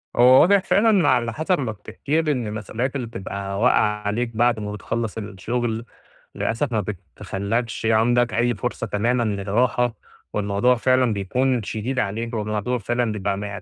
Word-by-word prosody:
هو 125 +2 +7
واضح 200 +3 +5
فعلًا 200 -6 +3
على 120 -3 +2
حسب 160 +3 0
ما 120 -5 -2
بتحكي 140 +9 -2
لي 155 -2 0
إن 125 -5 -2
المسؤوليات 110 +5 -3
اللي 125 -4 -3
بتبقى 100 -1 -5
واقعة 105 -3 +3
عليك 115 +2 -2
بعد 120 -1 +2
ما 105 0 -4
بتخلّص 115 +1 -3
الشغل، 115 +3 -3 0.5
للأسف 125 +3 -1
ما 110 - +2
بتخلّكش 100 - -4
عندك 120 +2 +3
أي 120 0 +1
فرصة 95 - -3
تمامًا 120 +4 +1
للراحة، 110 +4 0 0.4
والموضوع 105 +4 +2
فعلًا 130 -1 +2
بيكون 120 +5 0
شديد 115 +5 -3
عليك، 115 +3 -2
والموضوع 105 +3 -1
فعلًا 120 +1 -1
بيبقى 100 0 -3
115 Hz, 150 wpm, -22 LUFS, 105-125 Hz, 0.5 s, هو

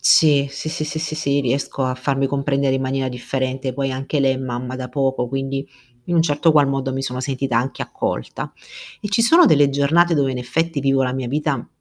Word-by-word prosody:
Sì, 145 -3 +5
sì, 140 +3 -5
sì, 155 -1 -3
sì, 155 +1 -4
sì, 155 -1 -3
sì 140 -2 0
riesco 135 +1 -1
a 130 0 0
farmi 135 +1 0
comprendere 140 0 0
in 135 - -1
maniera 130 0 -1
differente, 130 +1 -3
poi 135 +1 -2
anche 135 +3 -2
lei 135 -1 +3
è - - -4
mamma 130 -1 -4
da 130 -1 -5
poco 135 -3 0
quindi 135 +1 -3 0.4
in 175 - 0
un 165 - +5
certo 160 +1 +2
qual 145 -2 +4
modo 135 -1 -1
mi 135 +1 -3
sono 125 -1 -3
sentita 130 -2 -2
anche 130 +3 -3
accolta. - - -4 0.5
E 210 - -4
ci 205 +3 +2
sono 330 +10 +6
delle 145 - +5
giornate 160 +5 +3
dove 140 -3 +2
in 130 - -3
effetti 155 +6 -1
vivo 135 -1 +2
la 125 -1 0
mia 130 -1 -3
vita 150 +2 -2
135 Hz, 220 wpm, -20 LUFS, 130-145 Hz, 0.5 s, sono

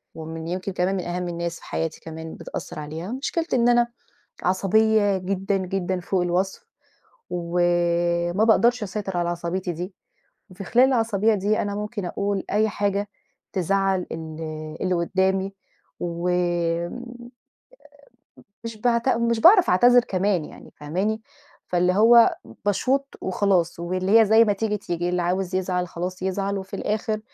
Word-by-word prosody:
ومن 160 0 -7
يمكن 185 +3 -3
كمان 180 +2 0
من 185 - -2
أهم 175 +1 -3
الناس 170 0 -3
في - - -16
حياتي 160 -1 -3
كمان 160 0 -8
بتأثّر - - -7
عليها، 160 +6 -6
مشكلتي 305 +5 -2
إن 240 0 +3
أنا 240 0 +4 0.6
عصبية 205 +2 +3
جدًا، 195 +1 -1
جدًا 185 -1 -2
فوق 180 +1 0
الوصْف 180 - -1 0.6
وما 175 +1 +1
باقدَرش 235 +2 +4
أسيطر 195 -2 -4
على 175 0 0
عصبيّتي 175 +1 -3
دي، 180 +3 -6 0.6
وفي 185 +2 -8
خلال 245 +7 +4
العصبيّة 225 -4 +2
دي 205 +2 +1
أنا 205 0 -3
ممكن 210 -1 -4
أقول 200 +2 -2
أي 215 +1 +3
حاجة 205 0 -1 0.4
تزعّل 195 0 +1
ال 160 -1 -7 0.4
اللي 185 -1 +1
قُدّامي 190 +2 0 0.5
و 170 0 -3
آآ، 175 +3 -1 1.6
مش 230 -1 -5
بعت 235 +1 +1
مش 235 -2 +1
باعرَف 370 - +7
أعتذر 245 +7 +6
كمان 185 -3 0
يعني، - - -13
فاهماني، 190 +9 -2 0.5
فاللي 180 0 +2
هو 230 +4 +6 0.3
باشوط 260 +7 +1 0.2
وخلاص 185 -3 +1
واللي 185 +5 +3
هي - - +6
زي 220 +2 +6
ما 210 - +2
تيجي، 210 +1 -1
تيجي، 175 -2 -3
اللي 180 0 0
عاوز 185 +1 -1
يزعَل 180 -1 -1
خلاص 180 +2 -5
يزعَل، 195 +1 -1
وفي 190 0 -8
الآخِر 215 +1 -2
190 Hz, 145 wpm, -24 LUFS, 175-210 Hz, 1.6 s, باعرَف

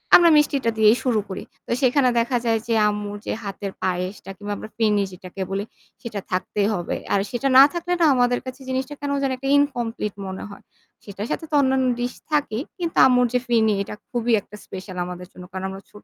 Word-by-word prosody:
আমরা 345 -1 +8
মিষ্টিটা 280 -5 +2
দিয়েই 220 +2 +6
শুরু 240 -4 +2
করি। 190 - -5 0.2
তো - - -5
সেখানে 255 0 +4
দেখা 240 +2 +1
যায় 225 -1 +2
যে 230 - +1 0.2
আম্মুর 205 0 -4
যে - - -1
হাতের 200 0 -5
পায়েসটা 185 +2 -2
কিংবা 205 0 -4
আমরা 215 - -8
ফিরনি 210 -3 +3
যেটাকে 185 +1 -9
বলি, 200 +1 -1 0.4
সেটা 220 -3 -5
থাকতেই 200 +2 0
হবে। 175 -4 -2 0.2
আর 200 - +4
সেটা 255 +2 -1
না 270 - +12
থাকলে 350 +1 -2
না - - +6
আমাদের 245 0 +2
কাছে 260 +1 -8
জিনিসটা 260 +2 -2
কেন 285 0 -2
যেন 270 - +1
একটা 270 +1 -5
ইনকমপ্লিট 240 -7 -1
মনে 190 0 -6
হয়। 200 - -12 0.4
সেটার 200 +1 -6
সাথে 325 - -2
তো - - -9
অন্যান্য 265 -1 +2
ডিশ 245 +1 -2 0.2
থাকেই 285 -5 0
কিন্তু 340 -2 -3
আম্মুর 250 -1 +4
যে 250 - +3
ফিরনি 225 -3 +3
এটা 200 - -7 0.2
খুবই 240 0 0
একটা 205 - -14
স্পেশাল 185 -1 -8
আমাদের 180 0 -7
জন্য। 180 - -11
কারণ 190 +1 -4
আমরা 195 0 -8
ছোট 210 - -14
225 Hz, 205 wpm, -23 LUFS, 200-260 Hz, 0.4 s, না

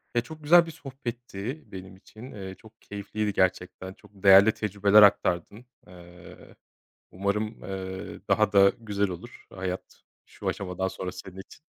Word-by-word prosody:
Ya, 120 - +3
çok 155 +3 -11
güzel 170 +3 +7
bir 165 - -8
sohbetti 125 -3 -7
benim 95 0 -9
için. 110 +6 -13
Eee, 95 -2 -8
çok 110 0 -19
keyifliydi 105 0 -4
gerçekten, 95 0 -1
çok 105 0 -21
değerli 100 +1 +7
tecrübeler 105 0 +4
aktardın. 100 +2 +3 0.2
Eee, 90 -1 -15 0.6
umarım, 105 +3 -2
eee, 95 -1 -6
daha - - +3
da 100 -1 +7
güzel 100 -3 -1
olur 90 +7 -10
hayat 95 0 -6 0.2
şu - - -9
aşamadan 95 -1 -2
sonra 95 -1 -5
senin 95 0 -11
için. 95 - -13
100 Hz, 145 wpm, -27 LUFS, 95-110 Hz, 0.6 s, güzel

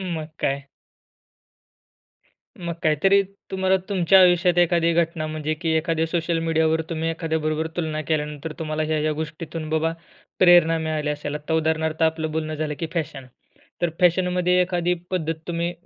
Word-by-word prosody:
मग 160 -4 -4
काय. 140 0 -1 1.9
मग 170 -1 -4
काहीतरी 195 +6 +4 0.3
तुम्हाला 190 0 +2
तुमच्या 190 -1 +5
आयुष्यात 175 -1 +4
एखादी 170 -1 +3
घटना 165 -1 0
म्हणजे 155 0 -2
की 165 +1 -3
एखाद्या 165 0 0
सोशल 170 0 -1
मीडियावर, 160 0 +1
तुम्ही 165 0 -1
एखाद्याबरोबर 160 -1 -1
तुलना 155 -2 -2
केल्यानंतर 150 0 -2
तुम्हाला, 155 -1 -2
ह्या, 155 0 0
ह्या 155 0 +1
गोष्टीतून 155 +1 -5
बाबा 160 +1 +1 0.5
प्रेरणा 175 -2 +6
मिळाली 155 -2 -2
असेल. 150 0 -4
आता 150 +2 -3
उदाहरणार्थ 160 0 0
आपलं 160 -1 +1
बोलणं 155 0 -2
झालं 150 -1 -3
की 165 - -2
फॅशन. 150 -5 -4 0.6
तर 170 - +2
फॅशनमध्ये 180 0 +3
एखादी 180 -1 +1 0.2
पद्धत 165 -3 -1
तुम्ही 170 0 -1
160 Hz, 145 wpm, -23 LUFS, 155-175 Hz, 1.9 s, प्रेरणा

